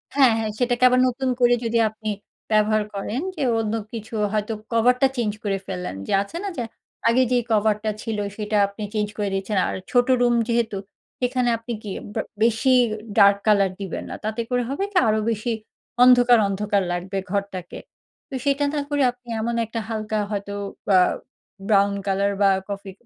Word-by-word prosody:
হ্যাঁ, 265 -5 +6
হ্যাঁ। 220 -1 -2
সেটাকে 245 0 +1
আবার 250 0 +3
নতুন 260 +1 -2
করে 245 0 +5
যদি 230 0 0
আপনি 215 0 -6 0.4
ব্যবহার 215 0 +3
করেন 215 +7 -3
যে - - -5 0.2
অন্য 220 0 -1 0.2
কিছু 225 +1 -7 0.2
হয়তো 215 +1 -1 0.2
কভার 235 +2 +4
টা 270 - +6
চেঞ্জ 220 -3 0
করে 200 -2 0
ফেললেন 180 - -4
যে - - -4
আছে 200 +12 -8
না 400 - -2
যে, 245 - -1 0.4
আগে 235 +3 +4
যে 250 - +4
কভার 215 -1 +3
টা 215 - 0
ছিল, 225 -3 -3 0.2
সেটা 210 0 -1
আপনি 200 +2 -8
চেঞ্জ 210 -1 0
করে 205 -1 -1
দিয়েছেন। 195 +2 -2
আর - - -3 0.2
ছোট 245 -1 +3
রুম 240 -1 +4
যেহেতু 230 -4 0 0.4
সেখানে 250 -1 +1
আপনি 230 +1 -6
কি 205 - -5 0.5
বেশি 235 +3 +3 0.4
ডার্ক 200 -1 +7
কালার 200 -3 +4
দিবেন 190 -4 -4
না। - - -5
তাতে 220 +2 -2
করে 245 -1 +1
হবে 285 +8 -2
কি, 375 - -1
আরো 215 0 +2
বেশি 225 +2 -2 0.5
অন্ধকার, 245 -1 +7
অন্ধকার 200 0 0
লাগবে 185 +2 -3
ঘরটাকে। 195 -3 -4 0.5
তো - - -12
সেটা 280 +1 +2
না 300 - 0
করে 290 -1 0
আপনি 245 0 -31
এমন 235 +1 -1
একটা 230 +1 -5
হালকা 215 -1 -2
হয়তো 200 -1 -4 0.3
বা 190 -3 +5 0.7
ব্রাউন 200 -1 +4
কালার 200 +1 +1
বা 200 - +6 0.2
কফি, 200 -1 -5
220 Hz, 180 wpm, -23 LUFS, 200-245 Hz, 0.7 s, ডার্ক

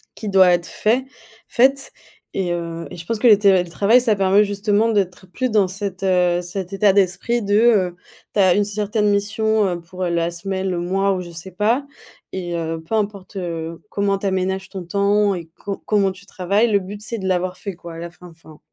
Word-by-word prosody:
qui 215 - -7
doit 190 -2 +6
être 175 -1 +2
fait 240 +5 0 0.4
faite. 270 +2 +2 0.4
Et, 185 -3 -1
heu, 170 -1 -4
et - - -8
je 170 - -9
pense 225 +3 -2
que 245 - +4
le 215 -3 +8
télétravail 200 +4 +4
ça 225 -4 +2
permet 195 +1 +4
justement 205 +2 +1
d'être 190 -4 -1
plus 255 +4 -1
dans 210 -4 +3
cet, 195 0 -5
heu, 180 -2 +2
cet 180 +1 -6
état 195 +1 +4
d'esprit 200 +5 +1
de, 205 -1 0
heu, 210 -6 +3 0.4
tu - - 0
as 185 -2 +5
une 205 +2 +2
certaine 210 +1 0
mission, 215 +1 +1
heu, 175 -2 -2
pour 180 +2 -7
la 170 -1 0
semaine, 190 +2 -3
le 180 - -2
mois 195 +3 +1
ou 185 - -2
je 175 -1 -9
sais 170 +3 -8
pas 225 +9 0 0.5
et, 175 -2 -4
heu, 165 -1 -3
peu 195 - -2
importe, 200 -2 -3
heu, 165 -2 -5
comment 200 -1 0
tu 195 - -3
aménages 190 0 -1
ton 190 -2 -6
temps 200 +2 +2
et 170 -2 -7
co 200 -1 -5
comment 200 -2 +2
tu 190 +1 -14
travailles, 200 +5 +1
le 205 -2 +3
but 200 +2 -8
c'est 230 +2 -4
de 190 -3 -4
l'avoir 185 0 -1
fait 200 -3 -6
quoi 170 -1 -10
à - - -9
la 170 +1 -7
fin, 180 +1 -14
enfin. 160 -2 -17
195 Hz, 215 wpm, -20 LUFS, 180-210 Hz, 0.5 s, le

